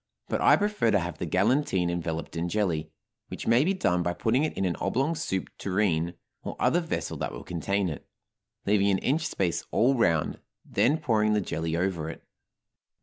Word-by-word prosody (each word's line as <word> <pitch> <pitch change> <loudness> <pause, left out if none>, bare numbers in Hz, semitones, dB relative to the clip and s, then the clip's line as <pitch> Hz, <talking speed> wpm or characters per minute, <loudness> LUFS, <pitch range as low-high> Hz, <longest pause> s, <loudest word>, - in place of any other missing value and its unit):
But - - -1
I - - +7
prefer 205 - +1
to 100 - +4
have 85 -3 -5
the 85 - -3
galantine 95 - +2
enveloped 85 -1 -4
in 85 +1 -1
jelly, 85 -7 0 0.4
which - - -7
may 115 +4 +4
be 190 +5 +1
done 90 - +1
by 85 0 0
putting 120 +9 +1
it 155 - -2
in 95 - 0
an 90 -2 0
oblong 135 +7 0
soup 95 - -3
tureen 90 -4 0 0.3
or - - -6
other 175 - +3
vessel 165 -2 -3
that - - -3
will - - -8
contain 95 +3 -1
it, 80 - -5 0.6
leaving 100 0 +3
an 95 - +3
inch 145 - 0
space 90 -5 -1
all 125 +4 +3
round, 85 -10 +1 0.3
then 145 +6 +2
pouring 110 -8 +2
the 105 - +3
jelly 80 -4 -2
over 85 -3 -1
it. - - -9
95 Hz, 190 wpm, -27 LUFS, 85-120 Hz, 0.6 s, I